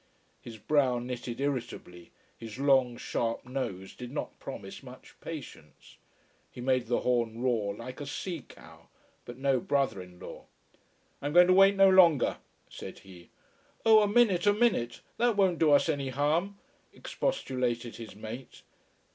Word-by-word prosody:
His 115 Hz, -2 st, -10 dB
brow 130 Hz, +3 st, +2 dB
knitted 120 Hz, 0 st, -5 dB
irritably, 120 Hz, -11 st, -4 dB, 0.3 s
his 115 Hz, 0 st, -9 dB
long, 130 Hz, -3 st, +3 dB
sharp 115 Hz, 0 st, -3 dB
nose 125 Hz, -8 st, -5 dB
did 125 Hz, -1 st, -9 dB
not 145 Hz, -, -5 dB
promise -, -, -8 dB
much -, -, -13 dB
patience. -, -, -10 dB, 0.5 s
He -, -, -13 dB
made 125 Hz, -1 st, 0 dB
the 120 Hz, -, 0 dB
horn 115 Hz, -2 st, 0 dB
roar 110 Hz, -6 st, 0 dB
like 130 Hz, +5 st, -9 dB
a 145 Hz, -, -6 dB
sea 170 Hz, +2 st, -5 dB
cow. -, -, -16 dB, 0.4 s
But 120 Hz, 0 st, -9 dB
no 135 Hz, -1 st, +1 dB
brother 135 Hz, -6 st, 0 dB
in 90 Hz, -1 st, -13 dB
law. -, -, -10 dB, 0.8 s
"I'm 145 Hz, +1 st, -3 dB
going 175 Hz, +1 st, +8 dB
to 185 Hz, -, +4 dB
wait 195 Hz, +1 st, +6 dB
no 195 Hz, 0 st, +6 dB
longer," 175 Hz, -7 st, +5 dB, 0.3 s
said -, -, -9 dB
he. 90 Hz, -3 st, -14 dB, 0.6 s
"Oh, 220 Hz, -1 st, +7 dB
a 210 Hz, -, +2 dB
minute, 205 Hz, -4 st, +3 dB
a 205 Hz, -, +6 dB
minute! 205 Hz, -, 0 dB, 0.2 s
That 235 Hz, -2 st, +2 dB
won't 185 Hz, -4 st, +2 dB
do 160 Hz, -, +4 dB
us 145 Hz, -, +5 dB
any 140 Hz, -4 st, -1 dB
harm," 155 Hz, +9 st, 0 dB, 0.3 s
expostulated 125 Hz, -, -3 dB
his 115 Hz, -3 st, -10 dB
mate. 110 Hz, +4 st, -9 dB
130 Hz, 155 wpm, -29 LUFS, 120-170 Hz, 0.8 s, going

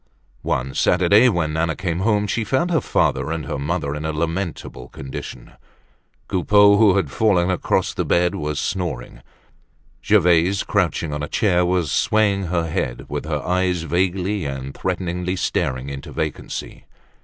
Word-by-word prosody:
One 65 Hz, -1 st, -2 dB
Saturday 100 Hz, +7 st, +4 dB
when 85 Hz, -7 st, -1 dB
Nana 80 Hz, 0 st, 0 dB
came 85 Hz, -2 st, -2 dB
home 105 Hz, +1 st, +1 dB
she 110 Hz, +3 st, -1 dB
found 130 Hz, -, 0 dB
her 165 Hz, -, +2 dB
father -, -, 0 dB
and 80 Hz, -3 st, -3 dB
her -, -, -4 dB
mother 75 Hz, 0 st, -2 dB
in 75 Hz, +1 st, -5 dB
a 80 Hz, -, -1 dB
lamentable 80 Hz, -6 st, -4 dB
condition. 65 Hz, -2 st, -8 dB, 0.8 s
Coupeau, 100 Hz, +2 st, +4 dB
who 105 Hz, -3 st, +5 dB
had 90 Hz, -8 st, 0 dB
fallen 95 Hz, -5 st, +2 dB
across 90 Hz, -, 0 dB
the -, -, -1 dB
bed 90 Hz, 0 st, +2 dB
was 75 Hz, -1 st, -3 dB
snoring. 80 Hz, -12 st, -4 dB, 0.8 s
Gervaise, 90 Hz, +3 st, +3 dB
crouching 85 Hz, -5 st, 0 dB
on 75 Hz, -, -3 dB
a 75 Hz, -, -3 dB
chair 90 Hz, 0 st, +2 dB
was 90 Hz, -4 st, 0 dB
swaying 100 Hz, 0 st, +2 dB
her 85 Hz, -1 st, -1 dB
head, -, -, -3 dB
with -, -, -4 dB
her 75 Hz, -2 st, -2 dB
eyes 90 Hz, -2 st, 0 dB
vaguely 95 Hz, +3 st, 0 dB
and 70 Hz, -1 st, -5 dB
threateningly 90 Hz, 0 st, -2 dB
staring 65 Hz, -7 st, -2 dB
into 70 Hz, -1 st, -7 dB
vacancy. 75 Hz, -1 st, -5 dB
85 Hz, 155 wpm, -21 LUFS, 75-95 Hz, 0.8 s, who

